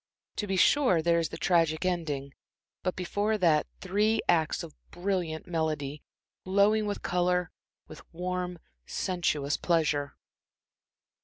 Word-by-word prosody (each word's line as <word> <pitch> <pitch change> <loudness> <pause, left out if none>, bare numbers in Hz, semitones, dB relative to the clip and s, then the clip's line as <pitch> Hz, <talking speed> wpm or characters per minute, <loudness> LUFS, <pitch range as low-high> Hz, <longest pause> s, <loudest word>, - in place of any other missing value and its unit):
To 210 - -2
be 195 - 0
sure, 185 - +4
there 170 0 +3
is 165 - -1
the - - -7
tragic 165 -3 +2
ending 150 -6 -2 0.5
but 185 - -1
before 205 +4 0
that, 165 -6 +3
three 210 +4 +1
acts 165 0 +2
of 160 -3 -9 0.2
brilliant 175 -3 -2
melody, 155 -4 -2 0.4
glowing 205 +3 +3
with 205 - -4
color, 180 -1 +1 0.4
with 155 - -11
warm, 180 +1 -3 0.3
sensuous 155 -6 -1
pleasure. 150 -4 0
175 Hz, 125 wpm, -29 LUFS, 160-185 Hz, 0.5 s, sure